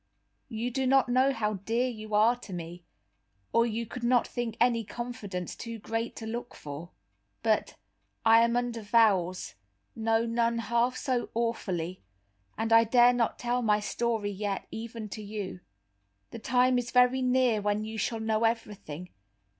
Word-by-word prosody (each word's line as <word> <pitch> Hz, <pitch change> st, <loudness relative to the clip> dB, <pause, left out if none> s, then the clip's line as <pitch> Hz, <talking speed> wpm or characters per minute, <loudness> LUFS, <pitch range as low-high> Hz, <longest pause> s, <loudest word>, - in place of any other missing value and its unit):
You 235 Hz, +1 st, -3 dB
do 265 Hz, +1 st, 0 dB
not 265 Hz, -1 st, +4 dB
know 260 Hz, +2 st, +4 dB
how 215 Hz, -4 st, -1 dB
dear 225 Hz, +6 st, -1 dB
you 215 Hz, -3 st, -5 dB
are 220 Hz, +3 st, +5 dB
to 210 Hz, -5 st, -10 dB
me, 175 Hz, 0 st, -7 dB, 0.7 s
or 230 Hz, 0 st, +4 dB
you 230 Hz, +1 st, -2 dB
could 235 Hz, +2 st, -8 dB
not 240 Hz, 0 st, +3 dB
think 240 Hz, -2 st, -4 dB
any 235 Hz, -1 st, +3 dB
confidence 205 Hz, -6 st, -5 dB
too 230 Hz, -1 st, -6 dB
great 225 Hz, +2 st, -3 dB
to 225 Hz, -, -7 dB
look 235 Hz, +2 st, -5 dB
for. 150 Hz, +4 st, -8 dB, 0.5 s
But 220 Hz, -2 st, +1 dB, 0.5 s
I 225 Hz, 0 st, +7 dB
am 235 Hz, +1 st, +2 dB
under 240 Hz, -2 st, -2 dB
vows, 200 Hz, -, +2 dB, 0.4 s
no 225 Hz, 0 st, +1 dB
nun 235 Hz, 0 st, +1 dB
half 235 Hz, +2 st, +1 dB
so 255 Hz, -3 st, -1 dB
awfully, 185 Hz, -7 st, -2 dB, 0.6 s
and 225 Hz, 0 st, 0 dB
I 230 Hz, 0 st, +8 dB
dare 240 Hz, +2 st, +5 dB
not 240 Hz, -2 st, 0 dB
tell 245 Hz, +1 st, -1 dB
my 210 Hz, -3 st, +3 dB
story 220 Hz, -1 st, -1 dB
yet, 200 Hz, 0 st, -3 dB
even 225 Hz, -1 st, -6 dB
to 215 Hz, -, -6 dB
you. 205 Hz, -3 st, -5 dB, 0.7 s
The -, -, -7 dB
time 250 Hz, +2 st, +3 dB
is 245 Hz, 0 st, -4 dB
very 250 Hz, +1 st, +4 dB
near 250 Hz, -3 st, +2 dB
when 205 Hz, +1 st, 0 dB
you 220 Hz, 0 st, -5 dB
shall 225 Hz, +2 st, -1 dB
know 220 Hz, 0 st, 0 dB
everything. 205 Hz, -7 st, -3 dB
230 Hz, 160 wpm, -29 LUFS, 210-240 Hz, 0.7 s, I